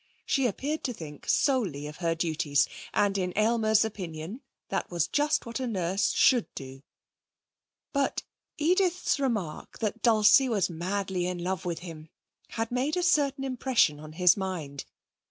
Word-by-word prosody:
She 270 -2 +2
appeared 285 +8 -3
to 250 - -1
think 150 -7 -9
solely 200 - +1
of 150 +1 -8
her 165 -2 0
duties, 155 -4 +1 0.2
and 200 -1 +2
in 180 -1 -2
Aylmer's 220 0 +3
opinion 185 - -6 0.3
that - - -2
was 170 -2 0
just 295 - +1
what 235 +2 -4
a 260 - -2
nurse 190 -3 0
should 245 -4 +4
do. 135 0 -8 1.1
But 280 -1 0 0.3
Edith's 360 0 +2
remark 215 - -3
that 225 0 -3
Dulcie 230 +3 +5
was 195 -5 +1
madly 185 +1 -2
in 180 0 -3
love 185 -1 -2
with 175 -1 -3
him 160 -2 -9 0.4
had 225 0 -3
made 265 +7 0
a 360 - 0
certain 285 -5 +2
impression 255 - +1
on 155 0 -10
his 180 +1 +5
mind. 165 -8 -4
200 Hz, 155 wpm, -28 LUFS, 170-255 Hz, 1.1 s, Dulcie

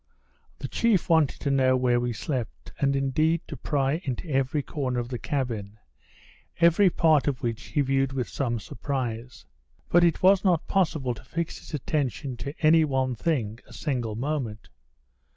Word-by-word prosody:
The 135 - -5
chief 205 - +1
wanted 160 -4 +3
to 140 - 0
know 130 -1 +3
where 125 -1 +2
we 120 0 -1
slept, 115 - -4
and 140 -1 +2
indeed 155 +5 +1
to 150 - -6
pry 140 +3 0
into 130 +4 -4
every 135 +1 0
corner 130 -5 -2
of 120 0 -4
the 125 -2 -4
cabin, 115 -7 -3 0.8
every 170 +3 +5
part 160 -4 +3
of 135 -4 -1
which 115 0 -3
he 145 - 0
viewed 135 0 +1
with 130 -2 -2
some 120 -4 -2
surprise. 125 0 -5 0.4
But 175 0 +5
it 170 0 +2
was 190 0 +5
not 180 -5 +2
possible 155 -9 0
to - - -12
fix 170 +6 -4
his 160 - -7
attention 140 -2 -2
to 140 +8 -6
any 160 +1 +6
one 130 -3 0
thing 115 -5 -1
a - - -14
single 120 -8 -2
moment. 120 - -3
135 Hz, 170 wpm, -26 LUFS, 120-155 Hz, 0.8 s, any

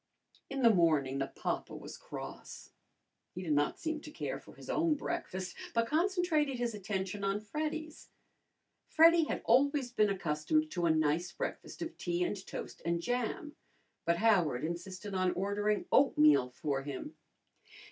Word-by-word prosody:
In 275 -1 -2
the 230 -2 +7
morning 150 -7 +3
the 135 - 0
papa - - -4
was - - -8
cross. - - -9 0.6
He 180 - -5
did 160 -4 0
not 145 0 +1
seem 315 -3 -3
to 300 - -9
care - - -4
for - - -15
his - - -12
own 320 -1 +2
breakfast, 185 -9 -4 0.2
but 230 0 +3
concentrated 320 -3 +1
his 240 -1 -1
attention 200 -1 -3
on 195 +1 +1
Freddy's. 310 +7 -5 0.8
Freddy 330 0 +6
had - - -3
always 270 +1 +3
been 215 -4 +3
accustomed 195 - 0
to 175 -2 0
a - - +3
nice 160 +2 +2
breakfast - - -5
of 330 - -7
tea 175 0 0
and 190 +1 -2
toast - - -7
and 170 0 0
jam, 250 - -2 0.5
but 170 0 +2
Howard 180 - +3
insisted 185 +4 -5
on 185 -1 +1
ordering 205 +2 0
oatmeal 150 - +5
for 135 +2 -2
him. 140 -1 -6
200 Hz, 155 wpm, -33 LUFS, 170-285 Hz, 0.8 s, the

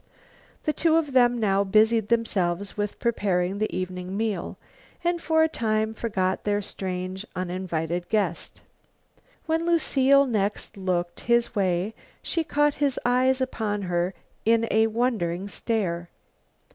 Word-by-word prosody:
The 305 - 0
two 320 +2 +2
of 300 -4 -1
them 245 -2 +4
now 200 -2 +2
busied 215 +2 +3
themselves 200 -5 0
with 205 -1 -3
preparing 195 -5 0
the 215 - 0
evening 185 +1 -4
meal, 215 -5 -2 0.5
and 345 0 0
for 320 -1 +3
a - - +4
time 220 -6 0
forgot 190 -5 -1
their 205 0 +1
strange, 185 -1 -4
uninvited 175 -2 -3
guest. 200 -6 -2 0.8
When 325 +1 0
Lucile 280 -5 +4
next 210 -5 -1
looked 175 -3 -2
his 235 0 +1
way 190 0 0 0.3
she 330 - 0
caught 295 -1 +2
his 280 -3 0
eyes 255 +2 +3
upon 215 -5 -2
her 175 0 -1 0.3
in 230 +1 +3
a 220 +1 +4
wondering 215 -6 -1
stare. 180 -6 -2
210 Hz, 135 wpm, -25 LUFS, 185-245 Hz, 0.8 s, them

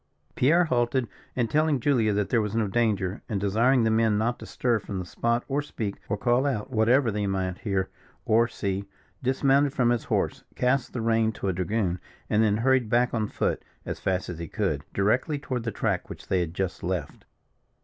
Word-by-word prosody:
Pierre 160 +8 +4
halted, 120 -2 +1 0.3
and 120 -2 +1
telling 155 +1 +2
Julia 120 -5 +2
that 105 -1 0
there 115 -3 +3
was 105 0 -3
no 110 -2 +1
danger, 100 -3 0
and 105 -4 -1
desiring 115 +6 +3
the 110 - +2
men 110 -1 +3
not 120 +3 0
to - - -9
stir 120 -3 0
from 100 -1 -6
the 90 - -4
spot, 115 +6 0
or 140 +1 0
speak, 110 -8 -4
or 105 - 0
call 120 +5 +2
out, 130 -2 -2
whatever 120 +2 +3
they 105 -1 -1
might 95 -1 -2
hear 95 -3 -1 0.4
or 115 +2 +4
see, 100 -3 -3 0.4
dismounted 135 +2 +2
from 120 -4 +2
his 120 -2 0
horse, - - -1
cast 125 +2 +1
the 125 - -2
rein 115 -1 +2
to 100 - -3
a - - 0
dragoon, 90 0 -1 0.3
and 105 - +4
then 105 -2 +3
hurried 130 -1 +2
back 120 +2 +2
on 110 -2 0
foot, - - -1 0.2
as - - -4
fast 95 -1 -1
as 85 -2 -6
he 85 - -5
could, 75 -1 -1
directly 120 +9 +1
toward 130 -3 -3
the 115 - -2
track - - -1
which - - -10
they 95 - +2
had 85 -1 -3
just 95 -2 -2
left. 90 -5 -4
115 Hz, 205 wpm, -26 LUFS, 100-125 Hz, 0.4 s, Pierre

